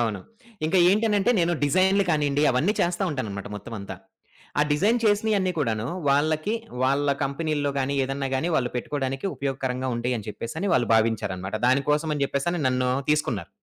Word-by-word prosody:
అవును. 110 -4 -1 0.5
ఇంకా 180 +4 +2
ఏంటి 210 +4 +2
అనంటే 210 +2 +2
నేను 170 0 +2
డిజైనులు 190 +6 +3
కానియండి 145 -2 +1
అవన్నీ 140 +11 +2
చేస్తా 175 +2 0
ఉంటానన్నమాట 105 -9 -4
మొత్తమంతా. 105 -1 -7 0.7
ఆ - - +6
డిజైన్ 205 +11 +2
చేసినయన్ని 205 -3 +2
కూడాను 115 -6 -1 0.2
వాళ్ళకి 155 +8 +1 0.3
వాళ్ళ 140 +2 +2 0.2
కంపెనీల్లో 145 0 -1
గాని, 135 +1 -1
ఏదన్నా 135 0 -3
గాని 135 +6 0
వాళ్ళు 125 -1 0
పెట్టుకోడానికి 135 +3 -3
ఉపయోగకరంగా 130 -2 -3
ఉంటాయని 120 -3 -2
చెప్పేసని 160 - -4
వాళ్ళు 120 -3 +2
భావించారన్నమాట. 105 -3 0
దానికోసమని 150 +3 +1
చెప్పేసని 170 +6 -1
నన్ను 125 0 0 0.2
తీసుకున్నారు. 120 - 0
140 Hz, 140 wpm, -25 LUFS, 125-165 Hz, 0.7 s, ఆ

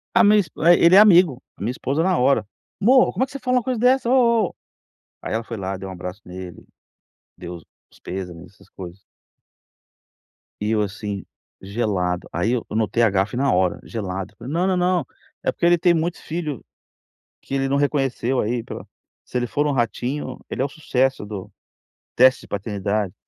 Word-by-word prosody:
A - - +6
minha 210 0 +6
esp 180 - -2
é, 170 +2 +7
ele 170 +3 +6
é - - +10
amigo. 175 - +6 0.2
A - - -15
minha 110 +5 -1
esposa 140 +5 -1
na 185 -2 +2
hora: 125 -4 +3 0.3
"Mô, 250 +5 +5
como - - 0
é - - +2
que 265 - -18
você 275 - -6
fala 255 0 +1
uma 245 - +1
coisa 255 -2 -2
dessa, 250 0 +3
oh, 235 -3 +4
oh?". - - -20 0.7
Aí - - -5
ela 115 - -1
foi 115 0 -6
lá, 95 0 -4
deu 95 0 -7
um - - -6
abraço 90 +3 -7
nele, 90 -1 -9 0.7
deu 90 0 -7
os 85 - -17
pêsames, 90 -1 -7
essas - - -21
coisas. 90 0 -9 1.6
E 105 - -2
eu, 110 -1 +2
assim, 100 -1 -4 0.4
gelado. 95 -4 -2
Aí 95 +7 0
eu 125 - -1
eu - - -5
notei 115 +1 +1
a 115 - +5
gafe 100 +4 0
na 135 +1 +2
hora, 90 -1 +1
gelado, 95 -2 -5
falei: 125 +4 -8
"Não, 180 +3 +1
não, 185 -1 +1
não, 180 -5 +1 0.4
é - - +1
porque - - -2
ele 175 0 +5
tem 175 +1 +3
muitos 165 +1 -1
filho 155 -6 -4 0.8
que - - -9
ele 135 0 0
não 140 +1 +1
reconheceu 135 -3 0
aí 115 +2 -1
pela - - -8 0.4
se - - -4
ele 120 -1 -1
for 145 +5 0
no 150 - +1
Ratinho, 130 +1 -2
ele - - -3
é - - +2
o - - -1
sucesso 135 -6 -1
do 100 -3 -7 0.6
teste 130 +1 +5
de - - -15
paternidade". 100 -1 -2
125 Hz, 200 wpm, -22 LUFS, -, 1.6 s, é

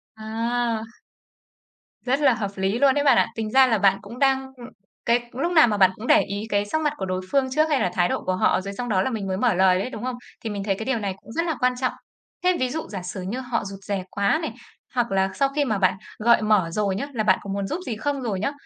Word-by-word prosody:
À. 225 +1 -2 1.2
Rất 265 +3 +1
là 275 -4 +4
hợp 205 -4 -3
lý 195 +4 -1
luôn 275 -2 +5
đấy 285 - +1
bạn 280 - +5
ạ. - - +4
Tính 220 -1 -3
ra 265 -1 +6
là 225 -3 +2
bạn 195 0 +4
cũng 230 +5 -10
đang, 265 -1 +2
ưm, 240 0 -10 0.4
cái 240 0 +1
lúc 330 +8 -2
nào 315 -7 +6
mà 210 -2 0
bạn 190 -1 +5
cũng 225 - -8
để - - +6
ý 200 +1 -4
cái 205 0 +1
sắc 315 +9 -1
mặt 300 -1 +1
của 190 - -3
đối 185 0 -2
phương 275 -2 +3
trước 310 +3 +2
hay 285 -3 +2
là 180 - +1
thái 175 -1 +2
độ - - -2
của 185 0 0
họ 185 - +2
rồi 200 +1 -6
xong 245 +2 -5
đó 190 -3 +2
là 260 - 0
mình 210 -5 -4
mới 190 0 -2
mở 240 -1 +2
lời 185 0 +4
đấy, 245 - -3
đúng 240 -3 -7
không? 255 -1 -2 0.3
Thì 225 - -3
mình 200 -1 -4
thấy 195 -2 0
cái 220 +3 -6
điều 265 -4 0
này 200 -2 -2
cũng - - -13
rất 335 +5 -1
là 325 -3 -1
quan 250 0 +2
trọng. 255 - 0 0.5
Thế 365 -1 +3
ví 255 -1 0
dụ 315 +4 -4
giả 190 -3 -5
sử 185 +1 -6
như 210 +8 -4
họ 250 -4 -2
rụt 195 0 -7
rè 200 -2 -2
quá 200 +10 +1
này, 320 - -4 0.4
hoặc 235 -4 0
là 190 0 +2
sau 275 -1 +1
khi 290 -1 +2
mà 215 -4 0
bạn 185 -1 +2 0.2
gợi 235 0 +4
mở 210 -6 +2
rồi 200 0 0
nhớ, 280 +8 -3
là 220 -2 -1
"bạn 190 -3 +3
có 200 - -9
muốn 200 -1 -2
giúp 320 - -3
gì 235 -4 -3
không?" 280 +2 -2
rồi 210 -6 -2
nhớ. 275 - -1
225 Hz, 285 wpm, -24 LUFS, 195-260 Hz, 1.2 s, ra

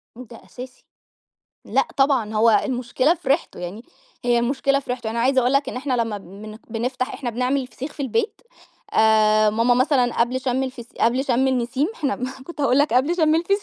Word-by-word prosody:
ده 240 -1 -12
أساسي، 255 +1 -11 0.8
لأ - - +1
طبعًا 265 -6 +2
هو 225 +2 +4
المشكلة 255 +4 +1
في 320 -5 -8
ريحتُه، 280 +5 0
يعني 180 +5 -6 0.4
هي 240 -1 +3
المشكلة 270 +3 +1
في 265 - -9
ريحتُه 245 -3 -3
أنا 230 +1 -2
عايزة 260 +2 +3
أقول 250 +1 +1
لك 275 +1 +2
إن - - -6
إحنا 260 0 -2
لمّا 220 -3 -4
بن 205 +3 -11
بنفتح 250 +3 -3
إحنا 250 -4 -4
بنعمل 255 +3 -1
فسيخ 275 +3 -8
في - - -12
البيت 430 - -1 0.5
آآ، 215 -1 +4
ماما 230 +3 +2
مثلًا 255 -2 +2
قبل 250 +2 +1
شم 255 0 -1
الفس 255 -3 -6
قبل 250 +4 +2
شم 260 0 +1
النسيم 260 +2 0
إحنا 285 -8 -2 0.3
كنت 335 -3 -8
هاقول 265 -2 +3
لك 290 -2 +2
قبل 285 +8 +2
شم 315 -3 +3
الفسيخ. 395 +5 +1
255 Hz, 190 wpm, -22 LUFS, 235-275 Hz, 0.8 s, هو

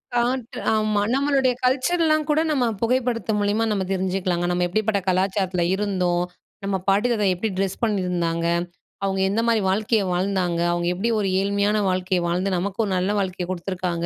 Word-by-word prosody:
காட்டு 240 0 -1 0.2
ஆமா. 215 -1 +1
நம்மளுடைய 270 -2 +2
கல்ச்சர்லாம் 310 +4 +2
கூட 300 +1 +3
நம்ம 260 -4 +2 0.2
புகைப்படத்த 235 -3 0
மூலியமா 205 +2 +1
நம்ம 200 -2 0
தெரிஞ்சுக்கலாங்க. 185 -2 -1
நம்ம 175 0 +1
எப்டிப்பட்ட 215 +2 0
கலாச்சாரத்ல 185 -1 0
இருந்தோம். 180 -3 0 0.4
நம்ம 195 - 0
பாட்டி 200 +5 +3
தாத்தா 210 -4 +1
எப்டி 220 +5 -2
ட்ரெஸ் 195 +2 -2
பண்ணியிருந்தாங்க? 180 -6 0 0.6
அவங்க 195 -1 0
எந்த 220 +3 +1
மாதிரி 230 -2 +3
வாழ்க்கைய 210 +2 +1
வாழ்ந்தாங்க? 180 -2 0
அவுங்க 175 0 -1
எப்டி 195 +6 -1
ஒரு 200 - 0
ஏழ்மையான 200 +1 +1
வாழ்க்கைய 185 0 0
வாழ்ந்து, 185 +2 0
நமக்கு 195 +4 -3
ஒரு 200 - -3
நல்ல 185 +3 0
வாழ்க்கைய 185 -2 -3
குடுத்துருக்காங்க. 180 -1 -3
195 Hz, 155 wpm, -23 LUFS, 180-225 Hz, 0.6 s, கூட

